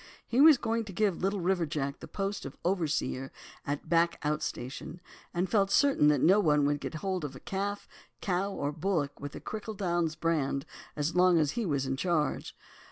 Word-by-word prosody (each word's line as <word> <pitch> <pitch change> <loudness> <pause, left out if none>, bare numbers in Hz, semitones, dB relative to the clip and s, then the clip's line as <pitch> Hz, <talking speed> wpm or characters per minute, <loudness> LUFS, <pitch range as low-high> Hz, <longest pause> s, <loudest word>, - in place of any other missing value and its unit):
He 245 +3 +3
was 310 -2 +9
going 230 -1 -1
to 205 - -8
give 200 -2 0
Little 195 +1 0
River 175 -2 +1
Jack 140 -2 -3
the - - -9
post 195 0 -3
of 135 - -8
overseer 155 -7 -1 0.4
at 145 0 -2
a - - -21
back 170 +1 +2
outstation, 150 0 -3 0.3
and 175 +2 0
felt 200 -2 +2
certain 270 - +4
that 150 -3 +4
no 190 +5 +6
one 150 -6 +3
would 145 0 +1
get 155 - -5
hold 185 -3 -1
of 135 -2 -5
calf, 200 +1 -3 0.3
cow, 195 +1 -1
or 145 -6 -2
bullock 155 -2 -1
with 145 0 -6
the - - -7
Crichel 215 -1 -6
Downs 175 -4 0
brand 150 -4 0 0.3
as 150 +3 -1
long 180 -1 +5
as 150 -3 +2
he 230 -4 -2
was 140 -4 0
in 135 0 -2
charge. 165 -2 -1
170 Hz, 195 wpm, -30 LUFS, 150-195 Hz, 0.4 s, was